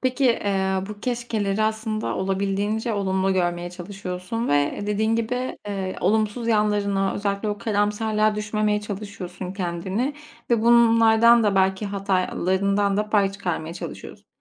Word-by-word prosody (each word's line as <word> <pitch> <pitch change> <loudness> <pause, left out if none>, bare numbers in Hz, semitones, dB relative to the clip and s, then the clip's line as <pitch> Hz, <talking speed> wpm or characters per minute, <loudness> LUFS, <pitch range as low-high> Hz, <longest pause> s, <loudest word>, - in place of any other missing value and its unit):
Peki, 255 +1 0
eee, 195 -5 +1
bu 210 -1 -8
keşkeleri 220 -4 -1
aslında 220 0 -1
olabildiğince 200 +4 -1
olumlu 190 -1 0
görmeye 175 -1 -1
çalışıyorsun 185 +4 -5
ve 145 0 +1
dediğin 220 +2 +1
gibi, 250 +3 -2
eee, 190 -2 -3
olumsuz 215 +4 +1
yanlarına 205 -3 +1
özellikle 200 +1 -2
o 205 0 -2
karamsarlığa 215 0 +1
düşmemeye 210 0 0
çalışıyorsun 195 -3 -6
kendini 190 +8 -2 0.4
ve 230 -2 +3
bunlardan 230 0 +6
da 205 -2 +2
belki 190 +2 +2
hatalarından 195 0 0
da 210 +1 -1
pay 200 -2 +3
çıkarmaya 175 -4 -4
çalışıyorsun. - - -9
205 Hz, 125 wpm, -23 LUFS, 190-220 Hz, 0.4 s, bunlardan